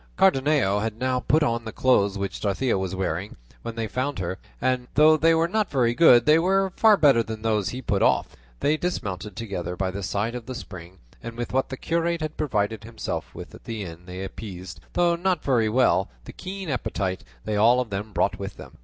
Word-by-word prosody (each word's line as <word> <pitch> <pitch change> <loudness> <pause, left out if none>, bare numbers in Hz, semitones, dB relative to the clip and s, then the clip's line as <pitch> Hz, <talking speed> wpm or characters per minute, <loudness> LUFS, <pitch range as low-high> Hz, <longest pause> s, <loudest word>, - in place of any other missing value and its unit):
Cardenio 140 - +3
had 110 0 -3
now 130 +1 0
put 155 +5 +2
on 115 -4 0
the 110 - -6
clothes 100 -6 +2
which 100 0 -4
Dorothea 110 +5 0
was 95 -1 -2
wearing 95 +1 -3 0.3
when 115 - -6
they 115 -1 -2
found 130 +5 -2
her, 95 +1 -4 0.2
and 125 -1 0
though 155 +2 +7
they 165 +1 +4
were 165 +1 +2
not 215 +3 0
very 120 -4 +2
good, 120 -4 +6
they 155 +2 +6
were 190 +2 +1
far 220 -2 +5
better 140 -8 +5
than 110 -1 -6
those 105 -4 +1
he 130 +1 -6
put 100 -3 0
off. - - +2 0.3
They 150 +2 +2
dismounted 105 - -4
together 95 -5 -4
by 95 +1 -1
the 100 +2 -5
side 105 +4 -2
of 125 -2 -7
the 130 - -5
spring, 90 -4 -9 0.2
and 115 0 -8
with 120 0 -4
what 135 0 +1
the 130 - -5
curate 170 +2 -1
had 155 0 -4
provided 110 -7 -1
himself 115 +1 -5
with - - -9
at - - -14
the 110 -3 -4
inn 85 0 -10
they 90 +1 -6
appeased, 95 -4 -8
though 175 -1 +3
not 180 -1 0
very 120 -5 +2
well, 125 +4 +3 0.2
the - - -9
keen 190 -3 -6
appetite 100 -7 -2 0.2
they 105 - -1
all 115 +4 +5
of 125 -4 -3
them 100 +2 -4
brought - - 0
with - - -6
them. - - -12
115 Hz, 215 wpm, -25 LUFS, 100-150 Hz, 0.3 s, though